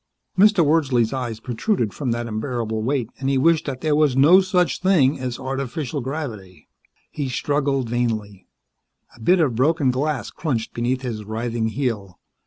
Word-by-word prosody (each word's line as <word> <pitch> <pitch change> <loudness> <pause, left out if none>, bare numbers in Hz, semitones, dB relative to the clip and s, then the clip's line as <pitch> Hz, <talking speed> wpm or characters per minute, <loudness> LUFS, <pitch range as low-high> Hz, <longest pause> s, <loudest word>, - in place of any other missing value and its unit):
Mr. 200 -3 +5
Wordsley's 135 -7 +2
eyes 120 -4 -3
protruded 120 - -1
from 135 +3 -3
that 120 0 -1
unbearable 110 -1 -3
weight, 125 0 -1
and 135 0 -1
he 135 - +2
wished 160 +4 +3
that 130 -2 -4
there 155 -2 +1
was 150 -4 +2
no 165 +8 +7
such 185 -2 +1
thing 160 -9 +3
as 125 -2 -4
artificial 135 +2 -3
gravity. 120 - -6 0.4
He 140 -3 -3
struggled 135 -1 0
vainly. 110 -5 -2 0.7
A - - -19
bit 180 +11 +3
of 145 -7 +2
broken 140 +3 +2
glass 135 -2 -2
crunched 135 -8 -3
beneath 125 +2 -1
his 115 -4 -4
writhing 115 +1 -2
heel. 110 -6 -3
130 Hz, 160 wpm, -22 LUFS, 115-150 Hz, 0.7 s, no